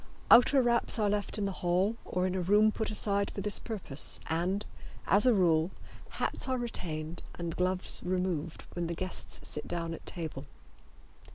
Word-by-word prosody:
Outer 255 +3 +7
wraps 235 0 +1
are 210 -2 +2
left 205 +1 -1
in 205 - -1
the 195 - -1
hall 180 +5 +2
or 180 0 -1
in 185 - -1
a 185 - -1
room 210 +4 +4
put 220 0 -3
aside 200 -1 +1
for 200 - -5
this 210 +1 -2
purpose, 190 - +2
and, 180 +6 -1 0.4
as 205 +5 +4
a 250 - +6
rule, 165 -3 +3 0.4
hats - - -2
are 260 - +1
retained 170 -9 -4
and 170 -2 -4
gloves 185 +1 0
removed 180 -3 -2
when 175 -1 -2
the 170 - -3
guests 185 +2 -4
sit 150 - -4
down 170 -1 -3
at - - -9
table. 155 -5 -4
185 Hz, 175 wpm, -31 LUFS, 170-210 Hz, 0.4 s, Outer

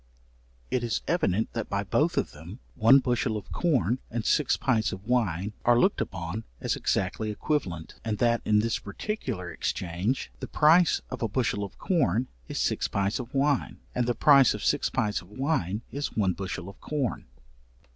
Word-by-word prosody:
It 125 - 0
is 115 -3 -1
evident 110 - +1
that 115 -2 -3
by 100 0 -1
both 155 - +1
of - - 0
them, 80 +8 -10 0.2
one 125 +3 +6
bushel 125 -4 0
of 105 - -9
corn 130 -7 +1
and 115 -1 -3
six 150 - +2
pints 115 -4 +1
of 95 +2 -8
wine 105 -5 0
are 120 0 +5
looked 195 - +3
upon 95 +4 -4 0.2
as - - -1
exactly 100 +3 -1
equivalent, 100 - -2
and 110 -2 -2
that 120 0 +2
in 105 -1 +3
this 115 0 -1
particular 100 - -4
exchange, 90 +8 -2
the - - -5
price 160 +3 +4
of 130 - -5
a 115 - +1
bushel 105 -3 0
of 100 - -8
corn 130 - +1 0.2
is - - -5
six - - 0
pints 100 +3 -1
of 125 -1 -6
wine, 140 0 +1 0.2
and 125 -1 0
the 120 - +1
price 140 -1 +6
of - - -5
six - - +2
pints 105 -1 0
of 90 - -17
wine 110 - -1
is 140 -3 -4
one 95 -4 +2
bushel 95 -1 -5
of 100 - -12
corn. 140 -6 -2
115 Hz, 180 wpm, -27 LUFS, 100-130 Hz, 0.2 s, one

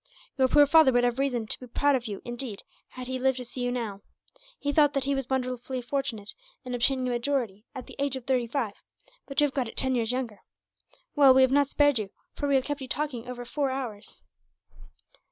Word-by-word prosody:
Your 265 -1 +3
poor 290 +2 +6
father 315 -1 +6
would 245 -1 +3
have 245 +1 +1
reason 250 -5 0
to - - -1
be 250 - -10
proud 285 +4 +2
of 245 -2 -2
you, 205 -2 -6
indeed, 240 -3 -5 0.3
had 255 0 -7
he 260 0 -3
lived 265 0 +2
to 250 - -5
see 250 +1 -6
you 245 0 0
now. 220 -5 -4 0.6
He 285 0 -2
thought 295 -1 +4
that 275 - +1
he 280 +1 +1
was 270 -2 -3
wonderfully 255 -1 -2
fortunate, 245 -5 -2 0.3
in 250 - -5
obtaining 255 +2 +2
a - - -1
majority 240 -4 -2
at 260 - -6
the - - -12
age 280 -1 0
of 260 -2 -7
thirty 255 -3 +1
five; 235 -4 -2 0.5
but 275 - -2
you 295 - +5
have 280 - -3
got 260 -4 -1
it - - -13
ten 260 -1 +3
years 235 -2 +1
younger. 245 -5 -3 0.8
"Well, 275 -3 +7
we 265 - +7
have 260 - +3
not 285 0 +3
spared 290 -4 +4
you, 205 -2 -4 0.2
for 285 - -3
we 280 - +4
have 265 - +3
kept 290 -1 -3
you 265 - -5
talking 255 -4 -3
over 245 -1 -6
four 280 +2 -1
hours." 245 -6 -6
255 Hz, 230 wpm, -27 LUFS, 240-275 Hz, 0.8 s, Well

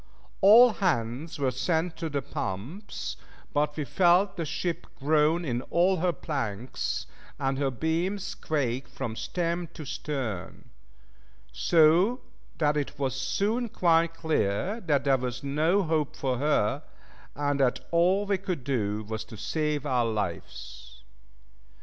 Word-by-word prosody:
All 225 +5 +9
hands 135 - -1
were 135 -3 +1
sent 160 +6 0
to 165 -1 -3
the 140 -2 -2
pumps, 125 - -5 0.4
but 150 0 0
we 150 - -1
felt 185 +4 +3
the 165 - -3
ship 170 +2 -3
groan 155 +4 +2
in 120 -3 -1
all 185 +2 +3
her 180 +1 +2
planks, 130 - -3 0.3
and 135 -1 0
her 140 -1 +1
beams 165 - -1
quake 135 -4 -2
from 110 - -5
stem 170 +5 -2
to 155 - -7
stern; 135 - -5 0.8
so 170 - +4 0.4
that 150 -1 +2
it 145 0 -3
was 135 -2 -1
soon 210 - 0
quite 165 -3 +2
clear 160 - 0
there 140 -4 +2
was 125 +1 -4
no 155 +8 +2
hope 155 -2 0
for 130 -5 -1
her, 140 -7 +1 0.5
and 145 0 0
that 130 -2 +2
all 180 +4 +3
we 200 -1 0
could 180 -8 -3
do 110 -6 -1
was 110 +1 -4
to 110 - -11
save 150 +5 -1
our 125 -4 +2
lives. 65 - -5
150 Hz, 135 wpm, -28 LUFS, 125-170 Hz, 0.8 s, All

